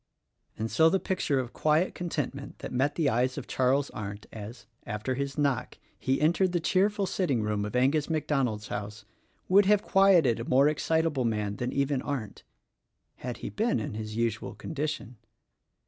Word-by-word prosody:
And 110 +1 -3
so 160 0 +5
the 195 - +2
picture 185 -8 0
of 125 -2 -4
quiet 155 +4 +2
contentment 145 -5 -4
that - - -7
met 135 +4 +1
the 160 -4 +1
eyes 125 +2 +1
of 140 - -5
Charles 135 +2 +1
Arndt 100 0 -6
as, 110 +3 -8 0.2
after 105 +4 -3
his 135 +1 -3
knock, 140 -5 0 0.2
he 135 +1 0
entered 175 +4 +2
the 175 - +2
cheerful 200 +4 +2
sitting 145 - 0
room 105 -1 -1
of 105 - -5
Angus 140 +5 +2
MacDonald's 135 -9 -1
house, 105 +1 -5 0.4
would 195 +1 +5
have 210 0 +4
quieted 180 -12 +4
a - - -3
more 135 +3 +5
excitable 155 -2 +1
man 105 -3 -1
than 125 +1 -2
even 140 -1 0
Arndt 130 -8 -4 0.4
— - - -54 0.3
had 125 -3 -5
he - - -4
been 220 - +1
in 110 - -4
his 110 0 -5
usual 115 -2 -2
condition. 150 -6 -4
135 Hz, 175 wpm, -28 LUFS, 115-160 Hz, 0.4 s, so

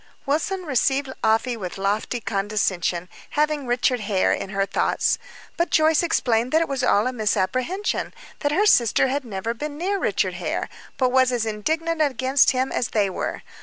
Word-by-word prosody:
Wilson 345 +7 -1
received 270 -2 0
Afy 225 +3 +2
with 185 -5 -6
lofty 205 +5 -1
condescension, 195 -5 -1 0.3
having 300 -2 +1
Richard 245 +1 +1
Hare 200 -3 +1
in - - -4
her 195 0 0
thoughts. - - 0 0.4
But 340 0 +1
Joyce 315 0 +4
explained 245 -8 +1
that 320 - +4
it - - -5
was 275 -2 -2
all 210 -4 +3
a 255 - -1
misapprehension 250 - -1 0.3
that 290 - 0
her 395 +8 +2
sister 250 - +4
had 280 +2 -1
never 220 0 -4
been 295 +4 -6
near 390 +4 -1
Richard - - 0
Hare, - - -3 0.3
but 255 -2 +2
was 260 0 +4
as 240 -2 0
indignant 315 +10 -1
against 265 -2 +3
him 260 +1 0
as 240 - 0
they 205 -3 0
were. - - -4
255 Hz, 170 wpm, -23 LUFS, 215-295 Hz, 0.4 s, Joyce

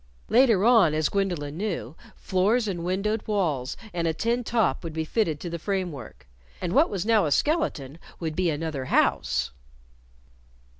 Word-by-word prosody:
Later 230 -5 +4
on, 220 -10 +5
as 155 -1 +1
Gwendolyn 175 -7 -2
knew, 180 - -3 0.2
floors 210 +5 +1
and 175 -4 -3
windowed 200 +5 -1
walls 155 -11 -1 0.2
and 170 -1 -1
a 160 - 0
tin 235 +6 0
top 225 -3 0
would 165 -2 -5
be 160 0 -2
fitted 160 -5 0
to 175 - -4
the 170 - -4
framework. 180 - -4 0.3
And 175 - -3
what 305 +4 +4
was 200 -2 -3
now 215 -6 +3
a - - -2
skeleton 170 - 0 0.2
would 160 -2 -3
be 180 0 +1
another 150 -3 -3
house! 60 - +1
180 Hz, 160 wpm, -26 LUFS, 155-215 Hz, 0.3 s, on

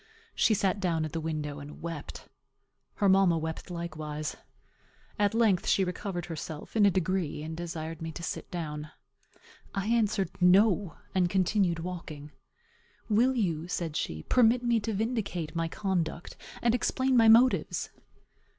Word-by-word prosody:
She 220 - +3
sat 195 0 +1
down 165 -4 0
at 155 - -6
the 165 - -3
window 150 -2 -3
and 145 +1 -10
wept. 165 -3 -7 0.7
Her 200 - +2
mamma 190 -3 +5
wept 160 +2 -5
likewise. 155 -3 -5 0.8
At 205 +1 +2
length 220 -6 +3
she 195 - +3
recovered 180 -1 -4
herself, 160 0 -7
in 210 -2 +6
a - - +6
degree, 180 -4 -1
and 160 +1 -5
desired 165 -1 -5
me 165 0 -4
to 170 - -8
sit - - -5
down. 150 -3 -5 0.9
I 195 0 -1
answered, 210 -5 +1
No, 190 0 +4 0.2
and 180 -2 +2
continued 190 -1 +2
walking. 160 -4 -7 0.8
"Will 240 +5 +3
you," 170 -8 -1
said 170 -3 -3
she, 80 - -3
"permit 245 0 +4
me 235 -1 +2
to 220 +1 -3
vindicate 205 -7 -2
my 165 0 0
conduct, 175 -2 -2 0.3
and 235 -1 +3
explain 260 +2 +1
my 230 -2 +6
motives?" 235 +3 +4
180 Hz, 150 wpm, -29 LUFS, 160-205 Hz, 0.9 s, in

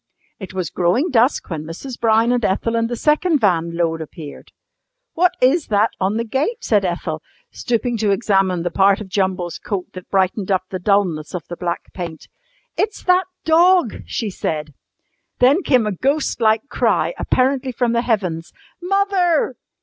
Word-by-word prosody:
It 190 -2 -9
was 180 -4 -3
growing 185 - +1
dusk 245 -3 +2
when 155 -2 -3
Mrs. 185 - -8
Brown 225 +1 +3
and 245 -1 0
Ethel 220 +4 0
and 230 0 0
the 240 - -2
second 305 +5 +2
van 170 -6 +1
load 165 -1 0
appeared. 155 -1 -10 0.6
"What 360 +2 +2
is 280 +6 +3
that 210 +1 +2
on 195 +3 0
the 230 - 0
gate?" 290 - -2
said 210 -3 +2
Ethel, 170 -3 -3 0.3
stooping 240 0 -1
to 210 -1 +1
examine 195 -4 +1
the 175 - -2
part 195 +2 +3
of 210 -3 -8
Jumble's 185 -3 -1
coat 195 -3 -5
that 185 -1 -10
brightened 190 +1 0
up 190 -2 +1
the 185 - -3
dulness 180 -5 0
of 175 - -4
the 175 - -5
black 175 -1 -4
paint. 170 -4 -7 0.5
"It's 420 +1 -2
that 365 0 +3 0.2
dog!" 340 - +4
she 220 -4 -3
said. 150 -4 -4 0.6
Then 270 +9 +4
came 255 - +2
a 210 - -1
ghost 270 - -1
like 220 +3 +2
cry, - - +1
apparently 260 0 +1
from 240 -1 0
the 235 - +2
heavens. 185 -9 -2 0.3
"Mother!" 365 -6 +1
215 Hz, 170 wpm, -20 LUFS, 180-260 Hz, 0.6 s, dog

